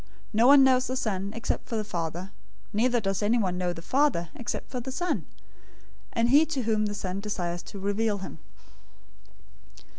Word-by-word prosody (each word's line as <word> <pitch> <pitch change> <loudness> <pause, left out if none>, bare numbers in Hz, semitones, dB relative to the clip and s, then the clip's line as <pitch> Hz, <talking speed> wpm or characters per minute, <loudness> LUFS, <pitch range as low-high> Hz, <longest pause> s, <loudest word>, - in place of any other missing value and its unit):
No 225 +3 +5
one 280 0 +9
knows 255 -1 +4
the 255 - -2
Son, 200 -5 -2
except 230 - -3
the 220 -2 -2
Father; 175 -2 -4 0.4
neither 240 +3 +2
does 195 -2 -1
anyone 205 -4 +2
know 180 -1 0
the 165 -1 -8
Father, 260 - +1
except 240 - -5
the 255 0 -4
Son, 350 +6 -2 0.8
and 230 +1 +1
he 290 +3 +7
to 300 -5 -2
whom 215 -1 +1
the 205 - -4
Son 185 -1 -3
desires 175 -4 -3
to - - -10
reveal 205 +2 0
him. 190 - -8
215 Hz, 160 wpm, -27 LUFS, 190-250 Hz, 0.8 s, one